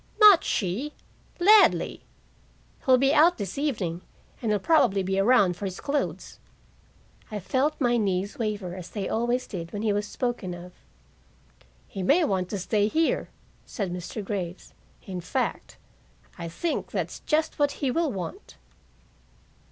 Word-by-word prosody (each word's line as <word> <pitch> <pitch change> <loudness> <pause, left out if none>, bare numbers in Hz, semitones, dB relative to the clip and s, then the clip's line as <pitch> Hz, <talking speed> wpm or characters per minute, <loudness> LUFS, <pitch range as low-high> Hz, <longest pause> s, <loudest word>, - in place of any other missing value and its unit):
"Not 415 -5 +8
she. 225 +10 -2 0.5
Ladley. 410 +4 +5 0.8
He'll 260 -1 +5
be 275 +2 +3
out 335 +4 +5
this 200 -4 -5
evening, 195 - -2 0.4
and 225 -3 0
he'll 210 - +3
probably 230 - +3
be 190 +1 0
around 200 -4 +4
for 200 - -6
his 185 -1 -5
clothes." 285 0 -3 0.9
I 210 -2 -4
felt 260 - 0
my 240 -3 +2
knees 200 +3 -1
waver, 210 -5 -2
as 185 -2 -8
they 200 -3 -4
always 240 +2 0
did 170 -3 -7
when 205 +1 -4
he 215 -2 +2
was 205 0 -1
spoken 235 -9 -3
of. 175 +1 -11 1.1
"He 195 - -6
may 290 - +4
want 185 -5 -1
to 205 - -3
stay 205 +2 +1
here," 320 +8 0 0.3
said 195 -6 -4
Mr. 180 +4 -6
Graves. 185 -3 -5 0.3
"In 185 -2 -5
fact, 255 +9 -3 0.6
I 170 -2 -6
think 310 - -3
that's - - -3
just 315 0 0
what 290 -1 +2
he 270 -3 -1
will 325 0 0
want." 200 - -7
210 Hz, 150 wpm, -26 LUFS, 185-280 Hz, 1.1 s, Not